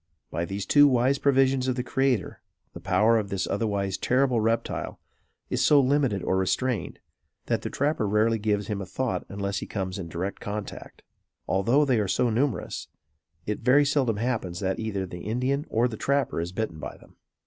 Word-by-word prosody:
By 85 +2 -2
these 95 +2 -4
two 145 0 +6
wise 130 +1 +2
provisions 135 -1 +3
of 130 - +1
the 125 - -2
Creator 130 -4 0 0.3
the - - -8
power 110 +5 +3
of 100 -2 -4
this 95 -1 -1
otherwise 100 -2 -1
terrible 130 -1 +2
reptile, 115 +1 -1 0.5
is - - +1
so 150 - +6
limited 135 -7 +2
or 95 - +1
restrained, 105 +3 -1 0.5
that - - 0
the - - -4
trapper 145 -6 0
rarely 110 +2 +2
gives 105 -1 0
him 105 -2 -3
a 95 - -6
thought 130 +5 -2
unless 100 -1 -3
he - - -7
comes 95 -1 -4
in 85 -3 -6
direct 90 +5 -4
contact. 105 0 -7 0.4
Although 115 +10 +3
they 130 -5 +2
are 105 - 0
so 120 +5 +1
numerous, 120 -3 -1 0.6
it 105 - -2
very 140 +3 +4
seldom 135 -6 +1
happens 110 -7 -2
that 95 -1 -1
either 100 -4 -2
the 90 -1 -8
Indian 130 - -1
or 115 +2 +2
the 110 -3 -6
trapper 140 -9 0
is 85 +1 -4
bitten 95 -5 -3
by - - -7
them. - - -21
110 Hz, 185 wpm, -26 LUFS, 100-130 Hz, 0.6 s, two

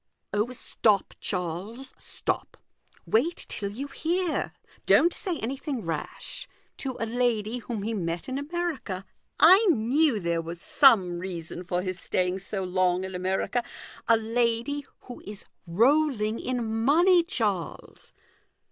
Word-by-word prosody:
" - - -48
Oh, 210 +4 +1
stop, 215 -4 +1
Charles, 195 +8 -3
stop! - - -1 0.5
wait 300 +11 +1
till 200 - -4
you 240 +8 -5
hear. 335 +4 -1 0.4
Don't 340 +1 +5
say 360 -4 -2
anything 265 - -4
rash. 165 - -5 0.3
To 260 -2 -4
a 230 - 0
lady 235 -1 0
whom 230 -3 -5
he 225 +2 -2
met 170 -4 -3
in 260 +1 -2
America 290 - -3 0.3
(I 375 +7 +8
knew 265 -1 +3
there 170 -2 0
was 170 +1 -7
some 185 -8 +4
reason 175 -1 -6
for 180 0 -1
his 185 -1 -3
staying 180 +1 0
so 195 0 -4
long 185 0 +1
in 190 0 -5
America) 190 +6 -1 0.4
a 230 - +6
lady 235 +5 0
who 245 - -10
is 205 -1 -7 0.2
rolling 230 - +2
in 250 -2 -2 0.2
money, 345 +7 +5
Charles 215 - -3
225 Hz, 135 wpm, -27 LUFS, 185-275 Hz, 0.5 s, I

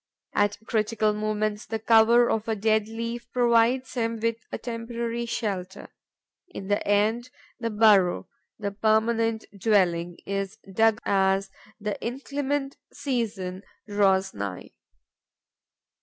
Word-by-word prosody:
At 205 0 +2
critical 215 -1 +1
moments, 215 0 -2
the 225 - -2
cover 230 +2 +5
of 220 0 -1
a 225 - 0
dead 215 0 +1
leaf 230 +2 -5
provides 245 +1 +3
him 230 -2 -1
with 230 0 0
a - - -3
temporary 235 0 -4
shelter. 195 -5 -4 0.6
In 195 - -8
the 205 - +1
end, 215 +4 +2 0.3
the 230 -1 -2
burrow, 210 -4 +4 0.3
the 205 -2 -3
permanent 220 +2 +1
dwelling, 175 -5 +1
is 195 +1 -3 0.2
dug 225 +1 +4
as 195 0 +2 0.3
the 210 -1 -4
inclement 275 +2 -3
season 210 -8 -3 0.3
draws 195 -2 +2
nigh. 100 -2 -6
220 Hz, 115 wpm, -26 LUFS, 200-230 Hz, 0.6 s, cover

